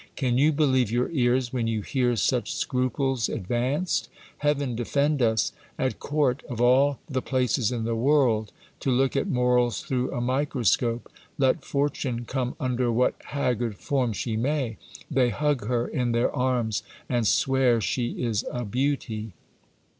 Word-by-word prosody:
Can 125 -3 +1
you 150 +3 +5
believe 130 -6 +2
your 120 +5 0
ears 125 -3 +1
when 120 -3 0
you 110 -2 -1
hear 125 -1 +1
such 120 +3 0
scruples 130 0 0
advanced? 125 - -1 0.3
Heaven 145 -4 0
defend 140 +5 0
us! 110 -3 +2 0.3
At 130 -1 -1
court, 140 -3 0
of 120 - -5
all 130 +3 +4
the 130 -4 -2
places 125 -3 0
in 120 -2 -2
the 115 +1 -1
world, 120 -4 +2 0.3
to - - -2
look 130 +2 +2
at 135 - +1
morals 125 -4 +2
through 125 -1 -1
a 130 - -3
microscope! 125 -2 0 0.3
Let 130 -1 +2
fortune 140 -4 -1
come 130 0 -2
under 125 -1 0
what 125 +2 +2
haggard 120 -6 -1
form 130 -4 0
she 110 +2 -3
may, 130 -1 -1 0.3
they 130 -3 +3
hug 145 -2 0
her 120 -1 0
in 125 -2 -1
their 120 +4 +1
arms, 125 -6 0 0.3
and 120 -4 +1
swear 130 -2 +3
she 120 +5 -2
is 115 -4 0
a 125 -1 -4
beauty. 115 -3 -2
125 Hz, 155 wpm, -26 LUFS, 120-135 Hz, 0.3 s, you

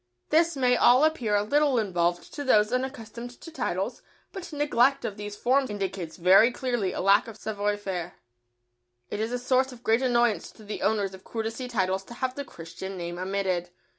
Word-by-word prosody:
This 330 0 +3
may 250 -2 +3
all 250 +3 +5
appear 255 -10 +2
a 205 - +2
little 285 +3 +2
involved 175 -5 0
to 290 - -4
those 215 -4 +3
unaccustomed 245 -2 -4
to 330 - -10
titles, 325 - -3 0.3
but 365 -3 -8
neglect 280 -2 +2
of 200 - -3
these 205 0 -6
forms 260 +4 +2
indicates 195 -5 -4
very 190 +7 +6
clearly 240 -7 -1
a - - -5
lack 195 +4 +4
of 225 -2 -9
savoir 205 -1 -2
faire. 180 -4 -5 1.0
It 205 - -3
is 220 +2 -1
a 245 - 0
source 255 +1 +1
of 245 -1 -13
great 225 +1 +3
annoyance 240 -4 +2
to 220 - -16
the 210 0 -6
owners 205 -2 +1
of 190 - -12
courtesy 225 +2 -4
titles 190 -5 0
to 235 - -11
have 260 0 -2
the 285 - -5
Christian 185 -2 -8
name 175 0 -5
omitted. 185 -2 -1
220 Hz, 190 wpm, -27 LUFS, 195-255 Hz, 1.0 s, very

